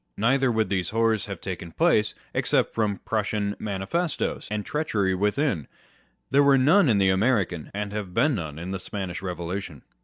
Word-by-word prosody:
Neither 130 Hz, +4 st, +3 dB
would 110 Hz, -1 st, +1 dB
these 90 Hz, -4 st, -1 dB
horrors 115 Hz, -2 st, +2 dB
have 100 Hz, -, -6 dB
taken 90 Hz, -3 st, -6 dB
place, 160 Hz, -11 st, +2 dB, 0.2 s
except -, -, +1 dB
from 105 Hz, -3 st, -1 dB
Prussian 105 Hz, -1 st, -1 dB
manifestoes, 110 Hz, -, -2 dB
and 105 Hz, 0 st, -3 dB
treachery 105 Hz, -11 st, 0 dB
writhin: 105 Hz, -, 0 dB, 0.6 s
there 140 Hz, +1 st, +5 dB
were 140 Hz, -1 st, +5 dB
none 155 Hz, +5 st, +5 dB
in 110 Hz, -, +4 dB
the 95 Hz, -1 st, +4 dB
American, 95 Hz, -, +1 dB
and 105 Hz, 0 st, -4 dB
have 105 Hz, -3 st, -4 dB
been 145 Hz, +11 st, +2 dB
none 80 Hz, -, -4 dB
in 85 Hz, +3 st, -5 dB
the 95 Hz, -, -3 dB
Spanish 95 Hz, -2 st, -5 dB
Revolution. 90 Hz, -3 st, -5 dB
105 Hz, 165 wpm, -25 LUFS, 95-120 Hz, 0.6 s, there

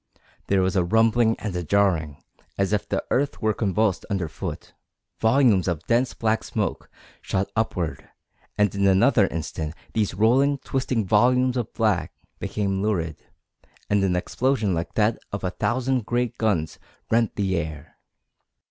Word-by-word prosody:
There 95 Hz, -1 st, +2 dB
was 95 Hz, +2 st, 0 dB
a 90 Hz, -, +3 dB
rumbling 115 Hz, +4 st, +3 dB
and 100 Hz, -3 st, -5 dB
a 90 Hz, -, -1 dB
jarring, 85 Hz, -5 st, +1 dB, 0.3 s
as 100 Hz, +1 st, 0 dB
if 105 Hz, -, -1 dB
the -, -, -1 dB
earth 140 Hz, +2 st, 0 dB
were 110 Hz, -1 st, +1 dB
convulsed 105 Hz, -1 st, 0 dB
under 95 Hz, -5 st, -1 dB
foot; -, -, -7 dB, 0.5 s
volumes 110 Hz, -5 st, +3 dB
of 85 Hz, -2 st, -2 dB
dense 120 Hz, +2 st, +1 dB
black 110 Hz, 0 st, 0 dB
smoke -, -, -3 dB, 0.3 s
shot 95 Hz, +1 st, -2 dB
upward, 90 Hz, -7 st, -2 dB, 0.5 s
and 105 Hz, -2 st, +2 dB
in 100 Hz, -1 st, +2 dB
another 100 Hz, +2 st, +4 dB
instant 80 Hz, -1 st, -4 dB, 0.2 s
these 105 Hz, -5 st, 0 dB
rolling, 130 Hz, +7 st, +3 dB
twisting 130 Hz, -5 st, -2 dB
volumes 125 Hz, +5 st, +3 dB
of 120 Hz, -3 st, -2 dB
black 100 Hz, -8 st, 0 dB, 0.3 s
became 95 Hz, -2 st, -2 dB
lurid, 85 Hz, -7 st, -2 dB, 0.7 s
and 100 Hz, -1 st, +3 dB
an 95 Hz, -2 st, +1 dB
explosion 110 Hz, +2 st, 0 dB
like 85 Hz, 0 st, -3 dB
that 110 Hz, +1 st, +2 dB
of 100 Hz, -, -4 dB
a 90 Hz, -, -1 dB
thousand 125 Hz, +2 st, -1 dB
great 120 Hz, -1 st, 0 dB
guns 95 Hz, -8 st, 0 dB, 0.3 s
rent 115 Hz, 0 st, +2 dB
the 95 Hz, -2 st, 0 dB
air. 75 Hz, -2 st, -5 dB
105 Hz, 150 wpm, -24 LUFS, 90-115 Hz, 0.7 s, another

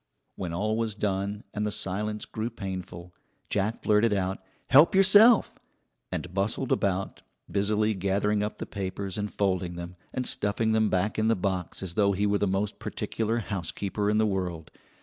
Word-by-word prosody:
When 90 Hz, -3 st, -4 dB
all 105 Hz, +6 st, -1 dB
was 115 Hz, -2 st, -1 dB
done, 100 Hz, 0 st, -2 dB
and 105 Hz, -, -2 dB
the 105 Hz, -, 0 dB
silence 105 Hz, +3 st, -2 dB
grew 110 Hz, +1 st, -4 dB
painful, 95 Hz, -5 st, -7 dB, 0.4 s
Jack 105 Hz, +3 st, -1 dB
blurted 105 Hz, +1 st, +3 dB
out: 95 Hz, -1 st, -1 dB, 0.3 s
"Help 150 Hz, +7 st, +6 dB
yourself," 205 Hz, +4 st, +6 dB, 0.5 s
and 90 Hz, -, -4 dB
bustled 105 Hz, +7 st, -1 dB
about, 95 Hz, -2 st, 0 dB, 0.3 s
busily 105 Hz, +3 st, +1 dB
gathering 100 Hz, +2 st, 0 dB
up 105 Hz, +1 st, -3 dB
the -, -, -5 dB
papers 95 Hz, -1 st, -4 dB
and 105 Hz, -1 st, -3 dB
folding 95 Hz, -3 st, -1 dB
them, 85 Hz, 0 st, -6 dB, 0.2 s
and 130 Hz, -, -3 dB
stuffing 110 Hz, +1 st, +1 dB
them 110 Hz, -1 st, +3 dB
back 95 Hz, +4 st, 0 dB
in 110 Hz, -, +2 dB
the 115 Hz, -, +4 dB
box, 95 Hz, -1 st, -3 dB
as 90 Hz, -3 st, -4 dB
though 100 Hz, +1 st, +3 dB
he 100 Hz, +2 st, 0 dB
were 100 Hz, 0 st, +2 dB
the 105 Hz, -, +1 dB
most 95 Hz, +2 st, -1 dB
particular 115 Hz, +1 st, -2 dB
housekeeper 100 Hz, 0 st, -2 dB
in 105 Hz, -, +2 dB
the 110 Hz, -, +3 dB
world. 90 Hz, -5 st, -3 dB
100 Hz, 170 wpm, -27 LUFS, 95-110 Hz, 0.5 s, Help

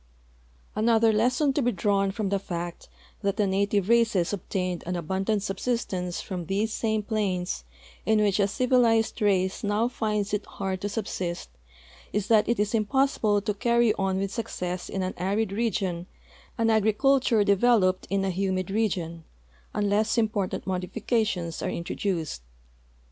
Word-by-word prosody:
Another 225 Hz, 0 st, +4 dB
lesson 250 Hz, +6 st, +2 dB
to 290 Hz, -, +1 dB
be 245 Hz, -1 st, +2 dB
drawn 195 Hz, -1 st, +1 dB
from 200 Hz, 0 st, -2 dB
the 200 Hz, 0 st, +1 dB
fact 175 Hz, -2 st, -6 dB, 0.3 s
that 200 Hz, 0 st, -1 dB
the 210 Hz, -, +3 dB
native 200 Hz, 0 st, +1 dB
races 225 Hz, -6 st, +3 dB
obtained 185 Hz, -2 st, -3 dB
an 180 Hz, -, -1 dB
abundant 190 Hz, +5 st, -1 dB
subsistence 195 Hz, -4 st, -2 dB
from 180 Hz, -4 st, -5 dB
these 210 Hz, +3 st, 0 dB
same 220 Hz, -2 st, 0 dB
plains 190 Hz, -, -1 dB, 0.4 s
in 220 Hz, 0 st, +3 dB
which 205 Hz, -1 st, +2 dB
a 200 Hz, -, +4 dB
civilized 230 Hz, 0 st, +2 dB
race 190 Hz, -2 st, +1 dB
now 210 Hz, +3 st, +1 dB
finds 210 Hz, -4 st, -2 dB
it 210 Hz, 0 st, 0 dB
'hard 190 Hz, -1 st, -4 dB
to 205 Hz, -, -2 dB
subsist 185 Hz, -, -4 dB, 0.6 s
is 210 Hz, -1 st, -2 dB
that 220 Hz, -1 st, +4 dB
it 235 Hz, -, +1 dB
is 210 Hz, +1 st, 0 dB
impossible 220 Hz, -2 st, +2 dB
to 210 Hz, +1 st, -1 dB
carry 235 Hz, +1 st, +3 dB
on 195 Hz, -2 st, -1 dB
Avith 195 Hz, 0 st, -2 dB
success 180 Hz, -6 st, -4 dB
in 190 Hz, -, -2 dB
an 185 Hz, -, -2 dB
arid 195 Hz, +3 st, 0 dB
region 195 Hz, -5 st, -1 dB, 0.5 s
an 225 Hz, -1 st, +2 dB
agri 220 Hz, 0 st, +3 dB
culture 260 Hz, -3 st, +3 dB
developed 200 Hz, -2 st, +3 dB
in 195 Hz, 0 st, +1 dB
a 190 Hz, -, 0 dB
humid 185 Hz, 0 st, -1 dB
region, 175 Hz, -6 st, -1 dB, 0.5 s
unless 210 Hz, +3 st, +1 dB
important 215 Hz, -4 st, 0 dB
modifica 195 Hz, +5 st, 0 dB
tions 170 Hz, -5 st, -3 dB
are -, -, -1 dB
introduced. 170 Hz, -, -3 dB
205 Hz, 155 wpm, -26 LUFS, 190-220 Hz, 0.6 s, Another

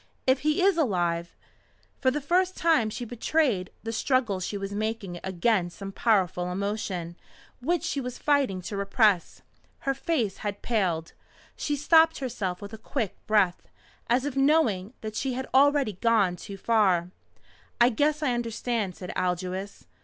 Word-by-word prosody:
If 260 Hz, 0 st, +3 dB
he 305 Hz, +5 st, +1 dB
is 390 Hz, -3 st, +4 dB
alive 175 Hz, -, 0 dB, 0.3 s
" -, -, -37 dB
For 260 Hz, -, +4 dB
the 285 Hz, +3 st, -1 dB
first 365 Hz, +5 st, +1 dB
time 320 Hz, -10 st, +3 dB
she 240 Hz, +3 st, -5 dB
betrayed 240 Hz, -, 0 dB
the 225 Hz, -, -3 dB
struggle 230 Hz, -4 st, +1 dB
she 195 Hz, +3 st, -3 dB
was 195 Hz, 0 st, -5 dB
making 210 Hz, -4 st, -3 dB
against 190 Hz, -1 st, 0 dB
some 195 Hz, -1 st, -6 dB
powerful 185 Hz, -5 st, +1 dB
emotion 190 Hz, -3 st, -3 dB, 0.5 s
which 330 Hz, +5 st, 0 dB
she 315 Hz, -5 st, -1 dB
was 250 Hz, -1 st, -5 dB
fighting 270 Hz, -11 st, +1 dB
to 200 Hz, -, -5 dB
repress. 200 Hz, -1 st, +1 dB, 0.4 s
Her 275 Hz, -, 0 dB
face 265 Hz, -, -1 dB
had 205 Hz, -1 st, -5 dB
paled. 180 Hz, -8 st, -1 dB, 0.4 s
She 295 Hz, -, -1 dB
stopped 320 Hz, +3 st, +5 dB
herself 205 Hz, -9 st, -3 dB
with 200 Hz, +2 st, -8 dB
a 220 Hz, -, -8 dB
quick 225 Hz, -3 st, -3 dB
breath, 205 Hz, -5 st, +2 dB, 0.4 s
as 250 Hz, +3 st, +2 dB
if 290 Hz, -2 st, -3 dB
knowing 265 Hz, -8 st, +2 dB
that 215 Hz, -1 st, -6 dB
she 260 Hz, +3 st, -1 dB
had 260 Hz, +1 st, -3 dB
already 280 Hz, -4 st, +4 dB
gone 200 Hz, -2 st, +2 dB
too 200 Hz, +2 st, -9 dB
far. 190 Hz, -5 st, +2 dB, 0.7 s
"I 240 Hz, +1 st, +6 dB
guess 295 Hz, +6 st, +1 dB
I 255 Hz, -4 st, +2 dB
understand," 230 Hz, -4 st, -2 dB
said 180 Hz, -, -7 dB
Aldous. 185 Hz, +2 st, -3 dB
220 Hz, 160 wpm, -27 LUFS, 190-270 Hz, 0.7 s, I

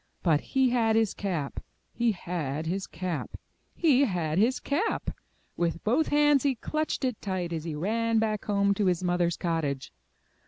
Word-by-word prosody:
But 160 Hz, -4 st, +3 dB
he 265 Hz, -1 st, +2 dB
had 225 Hz, -3 st, +2 dB
his 225 Hz, -3 st, +2 dB
cap! 170 Hz, -8 st, -3 dB, 0.3 s
He 235 Hz, -1 st, +1 dB
had 160 Hz, -5 st, -3 dB
his 190 Hz, +4 st, -2 dB
cap! 175 Hz, -1 st, -4 dB, 0.4 s
He 285 Hz, -5 st, +4 dB
had 175 Hz, -, -1 dB
his 240 Hz, +5 st, +3 dB
cap! 340 Hz, +11 st, -1 dB, 0.4 s
With 170 Hz, -1 st, -1 dB
both 255 Hz, +9 st, +2 dB
hands 295 Hz, -1 st, +4 dB
he 275 Hz, -2 st, +1 dB
clutched 310 Hz, +4 st, -2 dB
it 250 Hz, -4 st, -2 dB
tight 185 Hz, -3 st, -2 dB
as 160 Hz, -1 st, -4 dB
he 160 Hz, -3 st, -3 dB
ran 225 Hz, +7 st, 0 dB
back 215 Hz, -1 st, 0 dB
home 200 Hz, -1 st, +2 dB
to 200 Hz, 0 st, 0 dB
his 180 Hz, 0 st, +1 dB
mother^s 175 Hz, -1 st, +1 dB
cottage. 155 Hz, -, -2 dB
195 Hz, 165 wpm, -28 LUFS, 170-240 Hz, 0.4 s, He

